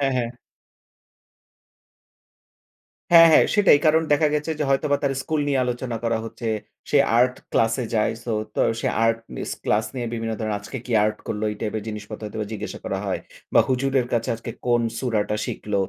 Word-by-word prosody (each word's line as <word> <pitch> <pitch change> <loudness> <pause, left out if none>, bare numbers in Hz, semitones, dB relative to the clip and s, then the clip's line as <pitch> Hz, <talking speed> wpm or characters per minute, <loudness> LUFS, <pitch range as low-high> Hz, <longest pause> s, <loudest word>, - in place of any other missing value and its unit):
হ্যাঁ, 135 -1 +1
হ্যাঁ। 120 -1 -1 2.8
হ্যাঁ, 165 -1 +10
হ্যাঁ - - +7
সেটাই 200 -8 +6
কারণ 160 +1 +4
দেখা 150 +1 +4
গেছে 150 +2 -1
যে 150 - 0
হয়তোবা 145 +1 +2
তার 140 -1 +1
স্কুল 155 +1 -1
নিয়ে 135 -2 +2
আলোচনা 125 -1 -3
করা 115 -1 +1
হচ্ছে। 115 0 -5 0.4
সে - - +5 0.2
আর্ট 125 +1 +4 0.2
ক্লাসে 115 +2 +2
যায় 110 0 +2
সো 120 - -2 0.2
তো - - 0 0.2
সে - - 0 0.2
আর্ট 115 0 +2 0.2
মিস - - -4
ক্লাস 110 +2 +2
নিয়ে 120 -2 -3
বিভিন্ন 115 -1 -3
ধরনের 110 -2 -2
আজকে 110 +6 -7
কি 125 - -4
আর্ট 105 0 0
করলো, 105 0 -3
এই 105 - -6
টাইপের 110 0 -2
জিনিসপত্র 105 0 -7
হয়তোবা 105 0 -4
জিজ্ঞাসা 105 - -5
করা - - -2
হয়। - - -1 0.3
বা - - +8
হুজুরের 130 -1 +1
কাছে 115 -1 0
আজকে 115 - -7 0.2
কোন 120 -1 +3 0.2
সুরাটা 110 -4 0
শিখল 105 -1 -5
120 Hz, 180 wpm, -23 LUFS, 110-135 Hz, 2.8 s, হ্যাঁ